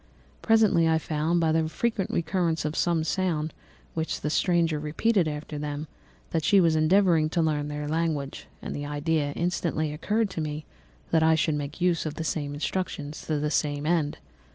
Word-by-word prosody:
Presently 215 -7 +4
I 160 - +4
found, 160 +2 0
by 165 -1 +2
the 160 0 +1
frequent 215 +3 -1
recurrence 165 -2 0
of 155 +1 -2
some 170 -2 +1
sound 160 -3 -1 0.4
which 160 0 -2
the 150 - -1
stranger 165 -3 +2
repeated 165 +5 +1
after 150 0 -5
them, 145 0 -4 0.5
that 160 -2 0
she 200 - +5
was 165 -3 +4
endeavouring 160 0 +4
to 170 - -1
learn 150 -2 +1
their 150 0 -4
language; 155 -3 -2 0.2
and - - -4
the 145 0 -4
idea 145 0 0
instantly 165 -3 -1
occurred 210 +7 0
to 165 - -3
me 150 0 -4 0.5
that 160 - +4
I 160 0 +5
should 160 0 +1
make 145 +3 -4
use 175 -3 +2
of 155 - -5
the 165 - -3
same 145 -3 -2
instructions 155 -2 -3
to 155 - 0
the 150 +1 -1
same 145 -1 0
end. 160 -3 +1
160 Hz, 180 wpm, -27 LUFS, 150-170 Hz, 0.5 s, she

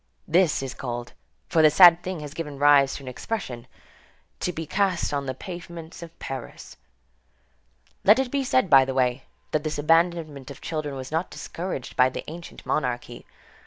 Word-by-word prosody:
This 170 -4 +3
is 135 -1 -5
called, 120 -2 -6 0.3
for 160 - +3
this 155 -1 +5
sad 175 -2 +9
thing 185 -3 -5
has 150 -1 -8
given 150 -3 -6
rise 140 -1 +5
to 140 - -8
an - - -11
expression, 125 - -5 0.7
"to 180 - -1
be 165 -1 -5
cast 185 -1 0
on 140 -1 -2
the 130 - -3
pavements 170 0 -9
of 170 0 -11
Paris." 135 -2 -8 1.3
Let 210 +3 +7
it 265 -2 -1
be 280 -1 0
said 255 -4 +2
by 135 -5 +7
the 130 0 -4
way, 125 -2 +1 0.3
that 150 - 0
this 155 -1 -3
abandonment 160 -3 +1
of 140 - -10
children 155 -3 -4
was 130 0 -7
not 165 +3 -1
discouraged 170 -7 -6
by 130 0 +5
the - - -6
ancient 170 +2 -10
monarchy. 120 -3 -3
155 Hz, 175 wpm, -25 LUFS, 135-175 Hz, 1.3 s, sad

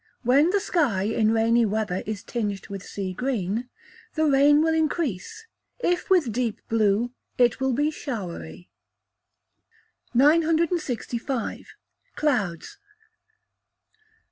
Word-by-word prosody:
When 275 +7 +4
the 405 +2 +2
sky, 290 - 0
in 215 +1 +1
rainy 230 +1 +3
weather, 210 -3 -1
is 215 -2 -4
tinged 210 -4 -4
with 195 -1 -6
sea 190 -2 -5
green, 235 0 -2 0.5
the 315 -1 +2
rain 290 +1 +5
will 320 0 +2
increase; 320 - -2 0.3
if 355 -7 -1
with 345 -11 +3
deep 235 -1 -2
blue, 225 +1 +2 0.3
it 245 0 +3
will 265 -1 +1
be 295 +5 +1
showery. 170 - -6 1.5
965. 300 -4 +1 0.4
Clouds. 215 - -1
245 Hz, 105 wpm, -25 LUFS, 210-300 Hz, 1.5 s, rain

